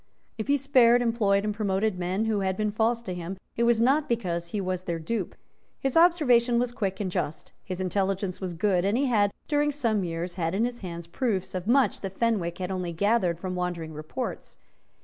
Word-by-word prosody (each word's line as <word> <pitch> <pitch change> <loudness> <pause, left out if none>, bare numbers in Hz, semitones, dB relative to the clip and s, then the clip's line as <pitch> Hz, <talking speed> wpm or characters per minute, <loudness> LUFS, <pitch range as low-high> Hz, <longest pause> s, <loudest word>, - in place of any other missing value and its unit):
If 220 - -5
he 285 0 +4
spared, 245 -3 +5
employed 210 -4 +2
and 210 - 0
promoted 200 -1 0
men 185 +5 -1
who 220 -2 +1
had 190 -1 -1
been 215 -1 0
false 230 +2 +1
to 185 - -4
him, 180 +2 -5 0.2
it 235 - +2
was 235 -1 +3
not 275 +6 +3
because 175 -8 -1
he 205 +4 -3
was 185 -1 -3
their 170 -1 -2
dupe. 190 +5 -3 0.4
His 270 -1 -2
observation 265 -9 +5
was 245 0 +1
quick 195 -5 -3
and 195 -3 -2
just; 155 -2 -3
his 185 -1 -5
intelligence 190 0 -1
was 180 -2 -4
good; 180 0 +2
and 200 +4 +1
he 280 - +2
had, 210 -6 +3 0.2
during 295 0 +2
some 230 -8 0
years, 170 +1 -3
had 170 0 -2
in 220 +4 +2
his 240 0 -4
hands 170 -3 -6
proofs 195 +1 -2
of 185 +1 -4
much 265 +2 +3
that 195 -1 -6
Fenwick 195 -8 0
had 185 0 -4
only 180 -2 -3
gathered 185 -2 +1
from 185 0 -4
wandering 175 -3 -3
reports. 155 +12 -6
200 Hz, 205 wpm, -27 LUFS, 180-235 Hz, 0.4 s, spared